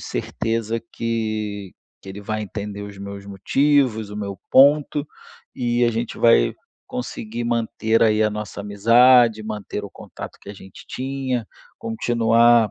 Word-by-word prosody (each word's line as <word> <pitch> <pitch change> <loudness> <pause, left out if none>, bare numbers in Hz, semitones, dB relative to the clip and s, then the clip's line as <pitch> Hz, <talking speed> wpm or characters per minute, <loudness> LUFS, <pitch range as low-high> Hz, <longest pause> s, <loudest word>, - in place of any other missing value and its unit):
certeza 115 0 -2
que 110 -4 -3 0.3
que - - -12
ele 100 +2 -8
vai 110 +1 -3
entender 100 0 -6
os 100 -1 -9
meus 100 0 -8
motivos, 110 +2 +1
o 105 - -7
meu 100 -2 -5
ponto, 145 +2 +4 0.5
e 120 0 0
a 120 - +3
gente 115 0 -4
vai 115 - +4 0.3
conseguir 120 -2 -5
manter 115 -1 0
aí 110 -1 +3
a 105 - +2
nossa 105 -1 -6
amizade, 115 +2 +5
manter 105 -1 -5
o 100 - -8
contato - - -10
que - - -14
a - - -9
gente 95 -1 -13
tinha, 130 -2 -3 0.3
continuar 120 - +3
110 Hz, 140 wpm, -22 LUFS, 105-120 Hz, 0.5 s, amizade